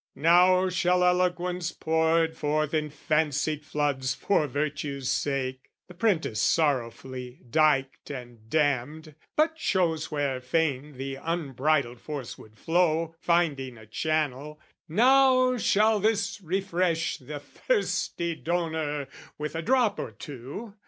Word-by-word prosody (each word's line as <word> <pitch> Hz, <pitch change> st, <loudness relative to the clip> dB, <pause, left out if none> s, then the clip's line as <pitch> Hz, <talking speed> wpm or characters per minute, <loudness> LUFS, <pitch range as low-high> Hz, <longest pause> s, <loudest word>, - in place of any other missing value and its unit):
Now 180 Hz, +5 st, +5 dB
shall 180 Hz, 0 st, +2 dB
eloquence 180 Hz, -1 st, +1 dB
Poured 160 Hz, 0 st, +1 dB
forth 155 Hz, 0 st, -1 dB
in 155 Hz, -1 st, 0 dB
fancied 150 Hz, 0 st, 0 dB
floods 145 Hz, -3 st, -1 dB
for 160 Hz, -7 st, +1 dB
virtue's 140 Hz, -1 st, -2 dB
sake, 130 Hz, -2 st, -2 dB, 0.2 s
(The 180 Hz, -, -12 dB
print 185 Hz, -2 st, +1 dB
is 110 Hz, -, -3 dB
sorrowfully 130 Hz, -2 st, -1 dB
dyked 140 Hz, -1 st, +1 dB
and 120 Hz, -5 st, -9 dB
dammed, 150 Hz, +2 st, 0 dB, 0.2 s
But 320 Hz, +1 st, +2 dB
shows 165 Hz, -, 0 dB
where 140 Hz, -4 st, -1 dB
fain 145 Hz, 0 st, -1 dB
the 135 Hz, 0 st, -5 dB
unbridled 140 Hz, -6 st, 0 dB
force 145 Hz, -6 st, -6 dB
would 110 Hz, 0 st, -16 dB
flow, 165 Hz, 0 st, +1 dB
Finding 145 Hz, -9 st, 0 dB
a 110 Hz, -, -13 dB
channel) 150 Hz, +3 st, -2 dB, 0.3 s
now 255 Hz, -, +5 dB
shall 215 Hz, -1 st, +3 dB
this 205 Hz, -1 st, 0 dB
refresh 180 Hz, -2 st, -1 dB
The 145 Hz, +2 st, -7 dB
thirsty 170 Hz, -, -1 dB
donor 160 Hz, -4 st, -2 dB, 0.3 s
with 150 Hz, 0 st, -4 dB
a 165 Hz, -, -1 dB
drop 245 Hz, +2 st, +2 dB
or -, -, -3 dB
two! 140 Hz, -, -8 dB
155 Hz, 120 wpm, -27 LUFS, 140-175 Hz, 0.3 s, Now